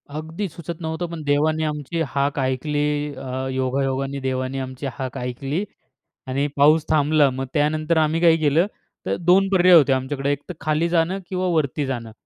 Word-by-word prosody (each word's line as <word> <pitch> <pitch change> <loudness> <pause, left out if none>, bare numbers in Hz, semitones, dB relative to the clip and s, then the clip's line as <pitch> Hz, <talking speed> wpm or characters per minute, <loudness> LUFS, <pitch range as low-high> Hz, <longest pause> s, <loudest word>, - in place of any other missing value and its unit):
अगदी 160 +6 -4
सुचत 170 +1 -7
नव्हतं. 160 +1 -3
पण 165 -2 -6
देवाने 155 +2 +1
आमची 150 +2 -3
हाक 140 +1 -1
ऐकली 135 +3 -1 0.3
अ, 130 0 -4
योगायोगाने 135 +1 -1
देवाने 130 0 -2
आमची 130 +1 -6
हाक 135 -2 -5
ऐकली 135 +7 -3 0.6
आणि 135 +3 0
पाऊस 150 +2 +5
थांबला. 150 -1 +4
मग 130 +1 -4
त्यानंतर 155 +2 +1
आम्ही 160 +1 +2
काय 165 -2 +5
केलं 155 +4 +2 0.4
तर - - 0
2 180 +3 +4
पर्याय 180 -2 +6
होते 145 -5 +6
आमच्याकडे 135 +2 -1
एकतर 145 +5 -4
खाली 155 +3 0
जाणं 170 +3 +1
किंवा 185 -1 -1
वरती 145 -1 0
जाणं. 120 -4 -4
145 Hz, 160 wpm, -22 LUFS, 135-160 Hz, 0.6 s, पर्याय